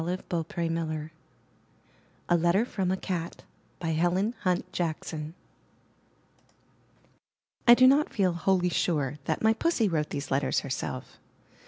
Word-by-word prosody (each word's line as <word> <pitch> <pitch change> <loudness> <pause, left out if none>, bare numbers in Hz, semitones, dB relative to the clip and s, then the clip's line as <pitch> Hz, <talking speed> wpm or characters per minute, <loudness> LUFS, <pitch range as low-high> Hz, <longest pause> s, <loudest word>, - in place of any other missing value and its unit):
312 170 -1 -3
IN 165 -1 0
THE 165 0 -1
NURSERY 155 -1 -5 1.2
A 175 - +4
LETTER 175 +6 +3
FROM 190 -6 -2
A 190 - 0
CAT* 175 -3 -4 0.4
Helen 175 +7 +1
Hunt 180 -1 -1
Jackson 160 -1 -3 2.3
I 240 - +10
do 255 - +6
not 280 +4 +4
feel 185 -4 +1
wholly 180 +1 +1
sure 150 -5 -1
that - - -1
my 220 0 +5
Pussy 245 -3 +1
wrote 155 -4 -1
these 140 0 -5
letters 135 +2 +1
herself. 130 -1 -5
175 Hz, 130 wpm, -28 LUFS, 155-190 Hz, 2.3 s, I